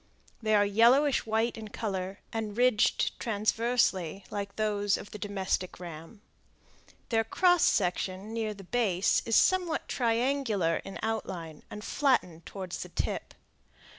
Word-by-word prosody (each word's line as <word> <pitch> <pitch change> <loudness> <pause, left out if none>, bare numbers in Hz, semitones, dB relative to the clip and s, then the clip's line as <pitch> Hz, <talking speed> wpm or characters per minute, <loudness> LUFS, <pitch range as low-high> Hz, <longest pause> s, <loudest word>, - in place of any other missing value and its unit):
They 215 -1 +2
are 205 0 +5
yellowish 240 +7 +4
white 225 +1 0
in 220 - -7
color, 195 -2 -4
and 220 -2 -3
ridged 245 -3 +2
transversely, 215 -4 0
like 200 -1 -4
those 205 -2 +1
of - - -10
the 210 - -8
domestic 190 -3 -2
ram. 170 +4 -10 0.9
Their 225 -1 +2
cross 355 +9 +3
section 190 +2 0
near 220 -2 -2
the 195 - -11
base 195 -3 +1
is 225 - +2
somewhat 360 -4 +2
triangular 230 - +1
in 195 - -7
outline, 180 -8 -4
and 210 - -8
flattened 180 - 0
toward 190 -3 -7
the - - -5
tip. - - -3
210 Hz, 135 wpm, -29 LUFS, 190-230 Hz, 0.9 s, are